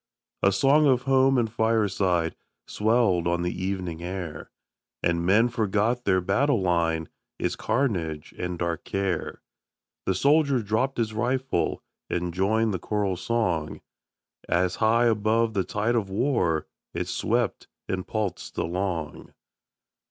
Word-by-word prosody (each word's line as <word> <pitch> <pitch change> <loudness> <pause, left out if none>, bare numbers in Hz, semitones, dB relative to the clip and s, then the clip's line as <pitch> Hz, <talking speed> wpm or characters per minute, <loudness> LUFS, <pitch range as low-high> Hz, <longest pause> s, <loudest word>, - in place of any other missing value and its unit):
A 100 - +4
song 140 +9 +4
of 125 -2 +3
home 135 0 +4
and 120 -2 +2
fireside 100 -7 +1 0.3
Swelled 105 -6 +2
on 85 0 0
the 90 - -1
evening 90 -3 -3
air, 85 -4 -6 0.5
And 85 0 +1
men 105 +7 +4
forgot 115 +1 0
their 95 -2 +3
battle 115 +8 +2
line, 85 -3 +1 0.3
Its - - -1
carnage 85 - -1
and 90 0 -4
dark 85 -1 -2
care; 95 -4 -3 0.6
The 95 - +2
soldier 140 - +3
dropp'd 110 +6 0
his 110 -2 -1
rifle 125 -3 -1 0.3
And 90 0 -2
joined 110 +4 +1
the 95 - -2
choral 100 0 -1
song, 90 -6 -1 0.7
As 90 +1 +1
high 115 +2 +3
above 110 0 +2
the 95 -3 +1
tide 105 +6 -1
of 110 -5 0
war 95 - +1 0.3
It - - -2
swept - - -1 0.2
and 95 -1 -3
pulsed 105 -4 -3
along. 85 -2 -3
100 Hz, 130 wpm, -26 LUFS, 90-115 Hz, 0.7 s, A